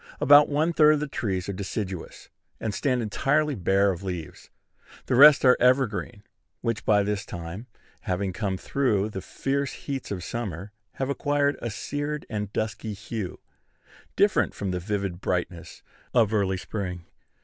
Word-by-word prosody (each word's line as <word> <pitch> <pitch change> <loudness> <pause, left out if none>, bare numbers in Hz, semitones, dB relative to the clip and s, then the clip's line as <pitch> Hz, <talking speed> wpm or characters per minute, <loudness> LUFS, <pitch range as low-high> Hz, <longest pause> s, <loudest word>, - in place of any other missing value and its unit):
About 145 +2 +7
one 155 +4 +1
third 155 -1 +6
of - - -2
the 150 - -2
trees 95 -9 -3
are 100 - -3
deciduous, 95 -1 -5 0.3
and 110 - -3
stand 125 -1 0
entirely 145 +8 +1
bare 100 -1 +2
of 90 -1 -6
leaves. 90 -5 -6 0.6
The - - -1
rest 140 +2 +8
are 125 - +7
evergreen, 120 -5 +1 0.4
which 115 -3 -2
by 105 -1 +4
this 105 -1 -2
time, 85 +7 -7 0.3
having 95 +1 -2
come 95 -1 -2
through 110 -4 0
the 95 - -5
fierce 140 +5 -2
heats 135 -2 -5
of 95 -4 -4
summer, 100 -2 -5 0.2
have 135 +1 -2
acquired 145 0 +1
a 120 - -3
seared 145 +7 -4
and 105 -2 -3
dusky 110 0 -3
hue, 110 -2 -6 0.7
different - - +2
from 100 -2 -3
the 90 - -2
vivid 100 -1 -3
brightness 90 -1 -3 0.3
of 110 -3 +4
early 95 -3 +1
spring. 90 -3 -5
105 Hz, 155 wpm, -26 LUFS, 95-135 Hz, 0.7 s, rest